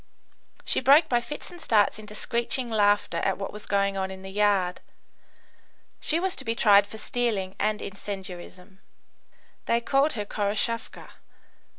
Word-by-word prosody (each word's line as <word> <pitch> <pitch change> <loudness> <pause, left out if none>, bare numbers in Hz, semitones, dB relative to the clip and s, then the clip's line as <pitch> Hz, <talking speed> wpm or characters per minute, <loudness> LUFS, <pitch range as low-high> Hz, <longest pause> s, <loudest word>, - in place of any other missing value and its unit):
She - - +1
broke 285 +5 +6
by 240 -4 +1
fits 295 +5 -7
and 350 -1 -12
starts 215 -1 +2
into 210 0 -10
screeching 235 +2 0
laughter 205 -2 +2
at 195 - 0
what 195 - -5
was 210 - -7
going 200 -1 +1
on 190 0 -2
in 190 0 -9
the 190 - -8
yard. 195 -3 +1 1.2
She 320 - 0
was 380 +1 -1
to - - -4
be 225 0 -1
tried 200 -3 +5
for 220 - -10
stealing 215 -6 -1
and 215 0 0
incendiarism. 190 -1 -8 0.9
They 235 - +3
called 275 +5 +2
her 210 -3 -4
Khoroshavka. 210 +3 -2
210 Hz, 155 wpm, -26 LUFS, 195-235 Hz, 1.2 s, broke